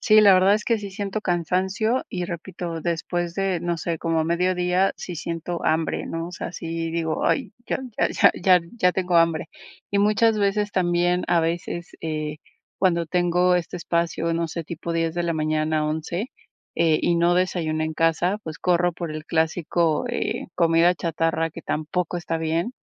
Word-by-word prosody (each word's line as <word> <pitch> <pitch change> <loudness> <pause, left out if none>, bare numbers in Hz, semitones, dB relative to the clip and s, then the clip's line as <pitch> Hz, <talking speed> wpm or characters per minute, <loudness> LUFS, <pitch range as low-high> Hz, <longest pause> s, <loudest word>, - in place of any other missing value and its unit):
Sí, 215 0 +6
la 200 -2 +7
verdad 190 +2 +5
es 210 - -2
que 230 -2 +1
sí 200 -1 -7
siento 200 +1 -3
cansancio, 190 +6 0
y 180 -2 -3
repito, 170 -1 -5
después 175 +1 -2
de, 195 -3 0
no 175 0 -1
sé, 165 0 -3
como 165 -1 0
mediodía, 180 +2 +1
sí 175 - -6
siento 170 +1 -4
hambre, 160 0 0
¿no? 165 +1 -4
O - - -11
sea, 175 - -6
sí 165 -1 -4
digo: 165 -1 -1
"Ay, 270 - 0
ya - - -1 0.2
ya - - +4
ya 185 -2 +4 0.2
ya 180 -4 +3
tengo 180 -2 0
hambre". 165 -1 +2 0.4
Y 200 - +1
muchas 215 +2 +3
veces, 205 0 +1
también, 175 0 +1
a 170 - +4
veces, 170 +1 -3
eh, 155 -1 -3 0.4
cuando 170 -3 +2
tengo 180 +1 +2
este 180 0 -2
espacio, 170 -1 -1
no 165 0 -1
sé, 165 0 -5
tipo 170 +1 -5
10 165 0 0
de 175 - -1
la 170 -1 0
mañana, 155 0 0
11 170 - -3 0.4
eh, 160 -2 +3
y 175 - +2
no 170 +1 +3
desayuné 165 -4 0
en 160 - -4
casa, 165 +5 +1
pues, 160 0 -7
corro 175 -1 +2
por 170 -1 -5
el 155 0 -6
clásico, 160 +1 +1
eh, 240 - -2
comida 170 +1 +4
chatarra 165 -1 -1
que 165 +1 -10
tampoco 175 +3 -2
está 170 -1 -2
bien. 165 +7 -1
170 Hz, 180 wpm, -24 LUFS, 165-180 Hz, 0.4 s, la